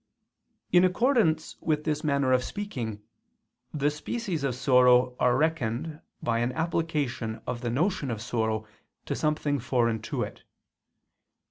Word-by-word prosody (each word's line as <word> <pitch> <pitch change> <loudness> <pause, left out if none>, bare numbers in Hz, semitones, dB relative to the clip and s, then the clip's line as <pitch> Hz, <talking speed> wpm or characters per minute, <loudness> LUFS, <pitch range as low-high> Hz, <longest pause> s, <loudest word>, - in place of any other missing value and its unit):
In 180 0 +6
accordance 185 - +2
with 150 -2 0
this 150 -1 -1
manner 140 -3 +2
of 130 -1 +3
speaking, 120 - -5 0.7
the 145 -1 +1
species 175 +1 -3
of 135 -3 0
sorrow 125 -1 +4
are 125 -1 +3
reckoned 155 0 -1 0.2
by 115 -1 +1
an 120 +1 0
application 150 -8 -1
of 120 -1 -4
the 120 - -2
notion 145 - 0
of 115 -3 -3
sorrow 110 -1 -1 0.4
to - - -2
something 150 -2 0
foreign 115 -2 +1
to - - -2
it. - - -8
140 Hz, 135 wpm, -27 LUFS, 120-160 Hz, 0.7 s, In